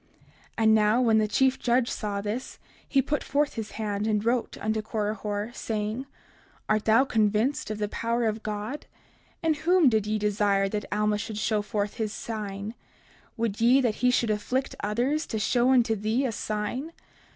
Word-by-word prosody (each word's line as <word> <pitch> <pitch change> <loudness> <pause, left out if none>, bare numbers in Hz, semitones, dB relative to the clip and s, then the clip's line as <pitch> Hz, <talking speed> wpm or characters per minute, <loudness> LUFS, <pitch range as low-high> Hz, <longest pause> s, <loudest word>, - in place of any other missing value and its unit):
30:51 - - -29 0.3
And 220 -1 +4
now 215 +2 +4
when 230 -3 +4
the 215 - +2
chief 260 +5 +2
judge 240 0 +2
saw 205 -4 -3
this, 215 +5 -4 0.3
he 270 -2 +3
put 295 +2 -1
forth 290 +1 0
his 220 -1 -6
hand 210 -1 -2
and 210 -1 0
wrote 235 0 0
unto 220 0 -1
Korihor, 210 0 -3
saying: 220 +4 -3 0.6
Art 215 0 +1
thou 225 +5 +5
convinced 220 +3 +1
of 215 - -3
the 210 -1 -1
power 230 +2 -1
of 220 0 -1
God? 215 +6 -5 0.6
In 325 -1 +3
whom 335 0 +4
did 215 -3 +1
ye 215 0 0
desire 205 -1 +1
that 210 +1 -3
Alma 210 0 +1
should 215 0 -5
show 215 0 +1
forth 205 0 -3
his 220 -3 -1
sign? 210 -1 -5 0.6
Would 225 -2 -2
ye 245 +4 +6
that 240 -5 0
he 250 - +4
should 240 -3 +2
afflict 250 +6 -1
others, 245 +9 0
to 220 - -3
show 240 +4 +2
unto 240 -4 +4
thee 220 +6 0
a 250 - 0
sign? 215 +9 -3
220 Hz, 180 wpm, -27 LUFS, 210-245 Hz, 0.6 s, ye